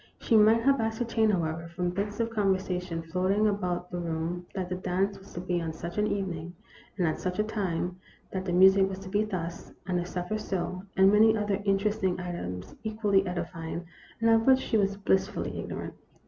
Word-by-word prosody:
She 230 - +2
might 220 +2 +6
have 275 -1 +4
ascertained, 225 0 +1
however, 165 -3 -1
from 180 -1 0
bits 205 +3 -3
of 230 0 0
con 205 -3 +2
versation 180 -3 -4
floating 190 +4 +2
about 180 -3 -2
the 175 - -3
room, 170 +1 -3
that 185 -2 -2
the 180 - -3
dance 185 +2 -1
was 195 - -15
to - - -5
be 180 -1 -1
on 160 -1 -3
such 170 +5 -5
an 210 - +2
evening, 175 -4 -3 0.4
and 180 -4 +2
at 155 - -1
such 180 0 -3
a 210 - +3
time; 185 -4 -2 0.3
that 190 -1 -3
the 180 - -1
music 190 +2 +6
was 190 - -5
to 195 0 -9
be 205 +2 +2
thus, 175 -5 -5
and 180 -2 0
the 175 - -2
supper 180 +4 -3
so; 185 -3 -3 0.2
and 190 +1 +7
many 220 +1 +5
other 205 -1 -1
interesting 195 -2 +1
items 95 - -5
equally 210 -3 +1
edifying, 170 -1 -4 0.3
and 230 0 +4
of 225 +1 +4
which 265 -1 +8
she - - -2
was 200 -2 +2
blissfully 195 0 0
ignorant. - - -5
190 Hz, 200 wpm, -28 LUFS, 175-210 Hz, 0.4 s, which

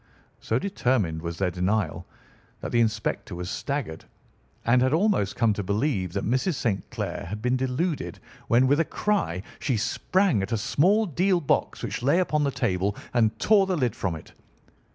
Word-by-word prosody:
So 115 - 0
determined 125 - 0
was 85 0 -5
their 90 -1 0
denial 90 0 -1 0.5
that - - -5
the 120 - +2
inspector 110 -4 -1
was 90 +1 -5
staggered, 135 - -4 0.6
and 125 +2 +4
had 130 +2 +2
almost 165 - +2
come 115 -3 +3
to 105 - -3
believe 100 - -1
that 100 - -2
Mrs. 130 - +1
St. 100 -7 -2
Clair - - -4
had 105 +3 -4
been 125 +3 +1
deluded 130 +6 -2 0.3
when, 120 +3 +4
with 145 +3 +3
a - - +4
cry, 165 - -1 0.2
she 130 -5 0
sprang 175 - +1
at 95 - -4
a 115 - +1
small 190 - +3
deal 180 +2 +1
box 150 - 0
which - - -3
lay 140 +7 +3
upon 155 -5 +1
the 140 - +2
table 100 -6 -1 0.2
and 115 -3 +2
tore 205 -3 +4
the 185 -2 0
lid 125 -7 0
from 90 -4 -2
it. 80 - -12
120 Hz, 180 wpm, -26 LUFS, 100-150 Hz, 0.6 s, and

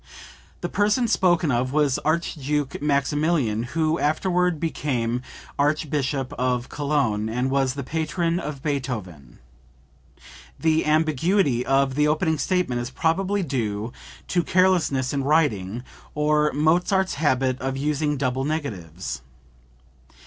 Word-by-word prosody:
The - - -1
person 210 +4 +2
spoken 175 -7 +2
of 125 +1 0
was 145 -3 +2
Archduke 150 -3 -1
Maximilian, 145 -4 +1 0.2
who 160 +1 +2
afterward 180 +2 +1
became 125 -7 -1 0.4
Archbishop 145 -2 0
of 125 -1 0
Cologne, 140 -8 0
and 125 +3 -1
was 135 -1 +1
the 140 - -4
patron 165 +4 -1
of 150 -5 -6
Beethoven. 110 - -4 1.2
[The 160 -1 +2
ambiguity 155 -2 +2
of 135 0 +2
the 150 +2 +2
opening 160 0 +1
statement 180 -9 0
is 120 - -4
probably 190 +8 0
due 115 -6 -2 0.4
to 175 - +2
carelessness 170 -8 +2
in 140 -1 -1
writing, 125 - +1 0.3
or 150 0 +2
Mozart's 175 +6 +2
habit 130 -3 +1
of 135 +1 -2
using 150 +1 0
double 130 0 -1
negatives. 95 - -4
145 Hz, 115 wpm, -24 LUFS, 130-160 Hz, 1.2 s, person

